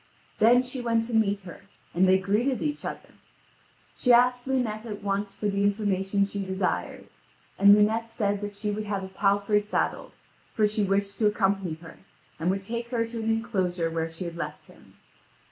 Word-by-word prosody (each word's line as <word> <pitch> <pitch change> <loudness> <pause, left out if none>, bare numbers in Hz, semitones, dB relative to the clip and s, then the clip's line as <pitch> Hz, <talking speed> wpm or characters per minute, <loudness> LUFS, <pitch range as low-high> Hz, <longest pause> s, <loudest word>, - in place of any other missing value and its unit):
Then 245 +3 +6
she 255 0 -4
went 230 -1 +1
to 230 +1 -6
meet 205 -2 +2
her, 180 -3 -11 0.3
and 185 +2 +3
they 190 - +6
greeted 215 +8 0
each 300 -1 -3
other. - - -6 0.9
She 250 - +2
asked 245 +1 +4
Lunete 240 -5 -1
at 210 -2 -7
once 200 0 -2
for 210 - -2
the 200 0 0
information 200 -1 +1
she 200 0 -4
desired; 190 -1 -2 0.5
and 200 +1 +8
Lunete 220 +2 +2
said 205 -3 -1
that 205 0 -5
she 210 +1 -2
would 210 +1 -3
have 200 -2 -3
a 190 - -7
palfrey 200 +2 +2
saddled; 210 +1 -2 0.4
for 215 - +2
she 210 0 +1
wished 200 +1 -1
to 215 - +4
accompany 195 -5 0
her, 165 - -12 0.4
and 165 +2 0
would 195 +1 -1
take 235 +3 -4
her 235 -2 -1
to 230 0 -6
an 220 - -1
enclosure 190 -7 -1
where 165 0 -2
she 165 +3 -7
had 170 0 -6
left 175 - -6
him. - - -19
205 Hz, 190 wpm, -26 LUFS, 195-225 Hz, 0.9 s, and